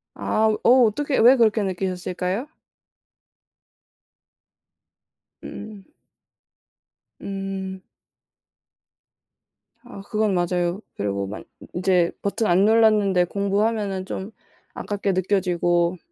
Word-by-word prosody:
아. 220 Hz, 0 st, +1 dB
어 255 Hz, +1 st, +6 dB
어떻게 270 Hz, +6 st, -1 dB
왜 245 Hz, +4 st, +7 dB
그렇게 220 Hz, -2 st, +3 dB
느끼셨을까요? 185 Hz, +3 st, -3 dB, 3.0 s
음. 210 Hz, -2 st, -9 dB, 1.4 s
음. 195 Hz, -1 st, -5 dB, 2.0 s
아 200 Hz, -, -11 dB
그건 215 Hz, -1 st, +1 dB
맞아요. 175 Hz, +1 st, -1 dB
그리고 100 Hz, -1 st, -2 dB
막 105 Hz, +3 st, -7 dB, 0.2 s
인 -, -, -12 dB
인제 180 Hz, -1 st, +2 dB
버튼 215 Hz, +2 st, -1 dB
안 180 Hz, +3 st, +4 dB
눌렀는데 210 Hz, -4 st, +4 dB
공부하면은 200 Hz, 0 st, -1 dB
좀 190 Hz, +2 st, -6 dB, 0.4 s
아깝게 200 Hz, -1 st, -2 dB
느껴지고. 175 Hz, -2 st, +1 dB
195 Hz, 185 characters per minute, -23 LUFS, 180-215 Hz, 3.0 s, 왜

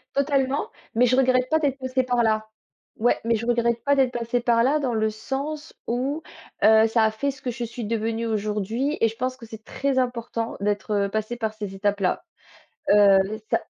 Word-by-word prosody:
Totalement, 275 Hz, -1 st, +1 dB, 0.3 s
mais 245 Hz, +2 st, +5 dB
je 250 Hz, +1 st, +3 dB
regrette 255 Hz, -1 st, +3 dB
pas 315 Hz, 0 st, +3 dB
d'être 280 Hz, -3 st, 0 dB
passée 260 Hz, 0 st, 0 dB
par 245 Hz, -1 st, +1 dB
là. 215 Hz, -1 st, +1 dB, 0.5 s
Ouais, 240 Hz, +2 st, +2 dB
mais 230 Hz, 0 st, +2 dB
je 225 Hz, +2 st, -3 dB
regrette 235 Hz, -1 st, +1 dB
pas 285 Hz, 0 st, +4 dB
d'être 260 Hz, -2 st, +3 dB
passée 240 Hz, 0 st, -1 dB
par 235 Hz, -1 st, +3 dB
là 290 Hz, +4 st, +3 dB
dans 255 Hz, -4 st, -1 dB
le 220 Hz, 0 st, +1 dB
sens 280 Hz, +7 st, -5 dB
où 270 Hz, +6 st, -1 dB, 0.4 s
heu, 220 Hz, +1 st, +6 dB
ça 225 Hz, 0 st, +2 dB
a 220 Hz, -, +2 dB
fait 280 Hz, +6 st, -2 dB
ce 270 Hz, -, -15 dB
que 250 Hz, -, -3 dB
je 240 Hz, 0 st, -5 dB
suis 235 Hz, -1 st, -5 dB
devenue 225 Hz, +1 st, -1 dB
aujourd'hui. 215 Hz, +6 st, -1 dB
Et 225 Hz, -, +4 dB
je 225 Hz, -, -6 dB
pense 255 Hz, +2 st, -3 dB
que 235 Hz, -, -11 dB
c'est 220 Hz, -1 st, -11 dB
très 270 Hz, +1 st, -1 dB
important 235 Hz, -2 st, -2 dB
d'être, 205 Hz, +1 st, -1 dB
heu, -, -, -3 dB
passée 220 Hz, +3 st, -3 dB
par 220 Hz, -2 st, -2 dB
ces 205 Hz, -3 st, -6 dB
étapes-là. 200 Hz, -, 0 dB, 0.7 s
Heu, 200 Hz, -1 st, +7 dB, 0.3 s
ça -, -, +2 dB
235 Hz, 205 wpm, -24 LUFS, 220-260 Hz, 0.7 s, Heu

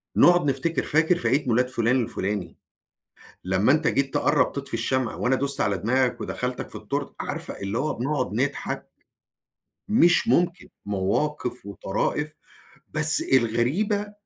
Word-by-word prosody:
نُقعد 175 Hz, -2 st, +5 dB
نفتكر، 135 Hz, +5 st, 0 dB
"فاكر 160 Hz, +3 st, +2 dB
في 115 Hz, -, -1 dB
عيد 130 Hz, +4 st, +1 dB
ميلاد 125 Hz, +2 st, +2 dB
فلان 125 Hz, 0 st, +1 dB
الفلاني، 95 Hz, -5 st, -4 dB, 0.9 s
لمّا 95 Hz, +6 st, +2 dB
أنت 155 Hz, +2 st, +2 dB
جيت 135 Hz, -2 st, 0 dB
تقرّب 150 Hz, -, +2 dB
تطفي 140 Hz, -2 st, -4 dB
الشمع 120 Hz, +1 st, -1 dB
وأنا 130 Hz, +2 st, +1 dB
دُست 140 Hz, +1 st, -2 dB
على 100 Hz, -1 st, +1 dB
دماغك 125 Hz, +6 st, 0 dB
ودخلتَك 125 Hz, 0 st, -4 dB
في -, -, -9 dB
التورتة؟" -, -, -4 dB
عارفة -, -, -5 dB
اللي 100 Hz, +3 st, -3 dB
هو 150 Hz, +4 st, -1 dB
بنقعد 130 Hz, -2 st, -2 dB
نضحك. 135 Hz, +6 st, -2 dB, 1.0 s
مش 195 Hz, 0 st, +4 dB
ممكن، 175 Hz, -3 st, +1 dB, 0.2 s
مواقف 120 Hz, +6 st, -2 dB
وطرائف 150 Hz, +9 st, -2 dB, 0.5 s
بس 155 Hz, 0 st, +5 dB
الغريبة 140 Hz, -, +1 dB
130 Hz, 135 wpm, -24 LUFS, 115-155 Hz, 1.0 s, نُقعد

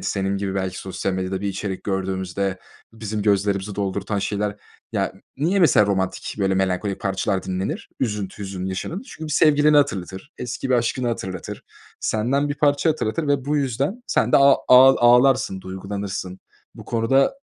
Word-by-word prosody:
senin 100 Hz, 0 st, -1 dB
gibi 100 Hz, -1 st, -3 dB
belki 95 Hz, -1 st, -2 dB
sosyal 95 Hz, 0 st, -3 dB
medyada 95 Hz, 0 st, -2 dB
bir 100 Hz, -, -2 dB
içerik 95 Hz, 0 st, -4 dB
gördüğümüzde 95 Hz, 0 st, -2 dB, 0.3 s
bizim 110 Hz, -2 st, -4 dB
gözlerimizi 100 Hz, -1 st, +1 dB
doldurtan 100 Hz, +1 st, -2 dB
şeyler 105 Hz, +1 st, -2 dB, 0.4 s
ya, -, -, -1 dB, 0.2 s
niye, 170 Hz, +8 st, +1 dB
mesela, 135 Hz, -, +5 dB
romantik 95 Hz, -2 st, -2 dB
böyle 95 Hz, -1 st, +1 dB
melankolik 95 Hz, +1 st, -1 dB
parçalar 95 Hz, 0 st, -1 dB
dinlenir, 95 Hz, -, -4 dB
üzüntü, 105 Hz, -6 st, -3 dB
hüzün 95 Hz, -1 st, -5 dB
yaşanır? 95 Hz, -, -4 dB
Çünkü 205 Hz, -, -10 dB
bir -, -, -3 dB
sevgilini 150 Hz, 0 st, +4 dB
hatırlatır, 95 Hz, -9 st, -1 dB
eski 125 Hz, +2 st, -4 dB
bir 130 Hz, -, +5 dB
aşkını 120 Hz, +1 st, 0 dB
hatırlatır, 95 Hz, -6 st, -5 dB, 0.4 s
senden 130 Hz, +7 st, 0 dB
bir 145 Hz, -, -2 dB
parça 145 Hz, +2 st, +2 dB
hatırlatır 150 Hz, 0 st, -2 dB
ve 140 Hz, -2 st, +1 dB
bu 150 Hz, +2 st, 0 dB
yüzden 140 Hz, -, -1 dB
sen -, -, +1 dB
de -, -, +8 dB
a 140 Hz, 0 st, +7 dB, 0.2 s
ağ 130 Hz, +1 st, +8 dB
ağlarsın, 120 Hz, -4 st, +4 dB
duygulanırsın. 95 Hz, 0 st, -5 dB, 0.3 s
Bu -, -, -11 dB
konuda, 120 Hz, -, +2 dB
105 Hz, 160 wpm, -22 LUFS, 95-135 Hz, 0.4 s, de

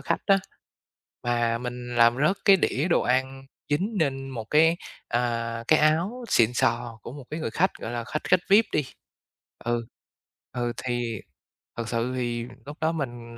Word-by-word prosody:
khách -, -, -1 dB
á, 195 Hz, -, +6 dB, 0.9 s
mà 120 Hz, -1 st, +1 dB
mình 125 Hz, 0 st, -6 dB
làm 120 Hz, 0 st, +5 dB
rớt 190 Hz, -, +2 dB
cái 195 Hz, -1 st, +8 dB
đĩa 155 Hz, -2 st, 0 dB
đồ 170 Hz, -, +3 dB
ăn 130 Hz, +1 st, 0 dB, 0.3 s
dính 195 Hz, +9 st, 0 dB
nên 135 Hz, -3 st, 0 dB
một 115 Hz, -4 st, -5 dB
cái, 160 Hz, +2 st, +5 dB, 0.3 s
à, 115 Hz, -1 st, -1 dB
cái 155 Hz, -, +6 dB
áo 170 Hz, +11 st, +1 dB
xịn 115 Hz, 0 st, +4 dB
sò 120 Hz, -2 st, 0 dB
của -, -, -8 dB
một 140 Hz, -2 st, -9 dB
cái 155 Hz, +1 st, -4 dB
người -, -, -2 dB
khách 190 Hz, +3 st, +2 dB
gọi 110 Hz, -, -5 dB
là 120 Hz, -1 st, -3 dB
khách 150 Hz, +5 st, -4 dB
khách 180 Hz, -1 st, +4 dB
VIP 210 Hz, +3 st, +7 dB
đi. 150 Hz, -, +1 dB, 0.8 s
Ừ, 120 Hz, 0 st, 0 dB, 0.7 s
ừ, 120 Hz, -1 st, -2 dB
thì 120 Hz, -3 st, -2 dB, 0.6 s
thật 115 Hz, -1 st, -3 dB
sự 120 Hz, +2 st, -1 dB
thì 120 Hz, -2 st, -2 dB, 0.2 s
lúc 145 Hz, +2 st, -8 dB
đó 160 Hz, -, +2 dB
mình 120 Hz, -6 st, -5 dB
125 Hz, 175 wpm, -26 LUFS, 120-155 Hz, 0.9 s, cái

